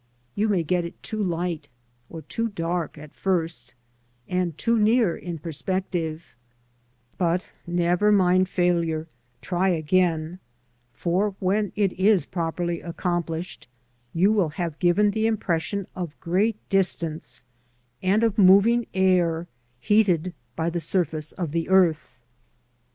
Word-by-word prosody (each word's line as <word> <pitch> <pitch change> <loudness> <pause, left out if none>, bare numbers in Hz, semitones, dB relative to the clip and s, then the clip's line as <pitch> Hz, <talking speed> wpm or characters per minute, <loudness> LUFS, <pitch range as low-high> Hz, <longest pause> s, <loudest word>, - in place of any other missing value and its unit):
You 215 +1 0
may 185 -5 +2
get 175 +2 0
it 170 - -9
too 215 -1 -4
light 175 -3 -2 0.4
or 160 -1 -8
too 230 +10 -2
dark 170 -4 -3
at 150 0 -11
first, 165 -10 -2 0.5
and 180 -3 -1
too 230 +5 +1
near 215 -4 +3
in 175 -2 -6
perspective; 165 +1 -3 0.9
but 175 +1 +1 0.2
never 175 +4 +2
mind 185 -2 +4
failure, 170 -3 0 0.3
try 185 +1 0
again, 170 0 +1 0.5
for 185 - -1
when 200 +2 0
it 200 -3 +1
is 195 0 +3
properly 170 0 -2
accomplished 170 -1 -3 0.4
you 185 +7 +3
will 200 -7 +2
have 160 0 -4
given 200 +4 +3
the 220 +1 +1
impression 200 -2 -1
of 175 -4 -6
great 195 +6 +1
distance, 170 -5 0 0.6
and 200 +4 +2
of 220 -1 +1
moving 200 +5 +6
air, 175 -3 +2 0.3
heated 185 - +2 0.2
by 165 +1 -1
the 170 0 -2
surface 160 -2 -1
of 170 -5 -4
the 165 +2 -2
earth. 180 -5 +3
180 Hz, 125 wpm, -24 LUFS, 165-195 Hz, 0.9 s, moving